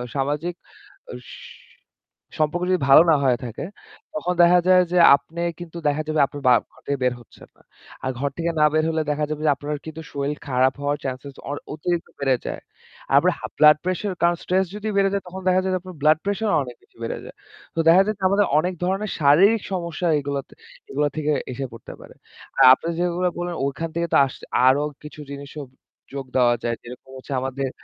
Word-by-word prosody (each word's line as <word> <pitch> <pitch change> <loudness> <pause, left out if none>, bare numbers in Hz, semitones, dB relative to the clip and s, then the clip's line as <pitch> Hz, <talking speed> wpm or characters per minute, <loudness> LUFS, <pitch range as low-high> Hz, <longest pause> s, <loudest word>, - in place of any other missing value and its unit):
সামাজিক 145 +5 -1 0.8
স - - -10 1.1
সম্পর্ক 155 +4 0
যদি 185 - +2
ভালো 140 - +9
না - - +5
হয়ে 125 -2 +3
থাকে, 120 +5 -6 0.5
তখন 180 -3 -2
দেখা 175 +1 +6
যায় 185 -1 +6
যে 180 - +1 0.2
আপনি 160 +5 -7 0.2
কিন্তু 170 -1 -9
দেখা 145 +1 +1
যাবে 155 -1 0
আপনি 145 - -9
বা 125 - +7 0.2
ঘর - - -23
থেকে 140 0 0
বের 125 -1 +2
হচ্ছেন - - -17
না। - - -25 0.4
আর 130 - 0
ঘর 140 0 0
থেকে 170 0 -1
না 150 - +6
বের 155 0 +2
হলে 160 -1 0
দেখা 150 +1 -1
যাবে 155 0 -4
যে 150 - +5
আপনার 145 +1 -4
কিন্তু 160 0 -7
শরীর 140 +1 -2
খারাপ 130 0 +2
হওয়ার 145 +1 0
চান্স 130 -1 -4 0.3
অ - - -2 0.2
অতিরিক্ত 170 +2 -2
বেড়ে 135 -2 +2
যায়। - - -5 0.5
আর - - -2
আপনার - - +2
হা - - -5
ব্লাড 150 0 +7
প্রেশার 185 +2 -2
কারণ 170 0 +4
স্ট্রেস 190 +1 +1
যদি 210 +1 -5
বেড়ে 195 0 +3
যায় 200 -2 -1
তখন 190 +1 -8
দেখা 185 0 +4
যায় 190 0 -1
যে - - -1
আপনার 185 -3 -11
ব্লাড 155 +1 +5
প্রেশার 205 +1 -1
অনেক 125 -2 -9
বেশি - - -29
বেড়ে 115 - -4
যায়। - - -11 0.4
তো - - -3
দেখা 180 +3 +7
যায় 215 - -1
আমাদের 200 0 +3
অনেক 180 +3 -1
ধরনের 195 +3 -1
শারীরিক 190 +10 +5
সমস্যা 170 0 -3
এগুলোতে 140 -1 -5 0.4
এগুলা 145 +1 +1
থেকে 150 -1 0 0.2
এসে 135 +2 -4
পড়তে 115 - -10
পারে। - - -14 0.4
আর - - +7
আপনি 165 - -2
যেগুলো 180 +1 0
বললেন 175 -1 -3
ওখান 160 +4 -3
থেকে 170 0 0
তো - - +6
আস 130 - -7 0.3
আরও 140 +3 +4 0.2
কিছু 150 0 -11
জিনিসও 140 +1 -8 0.5
যোগ 135 -1 -4
দেওয়া 120 -1 +4
যায়। 115 -1 -1
যেরকম 125 +2 -12
হচ্ছে 135 +2 -7
আমাদের 135 0 -3
155 Hz, 205 wpm, -22 LUFS, 140-180 Hz, 1.1 s, ভালো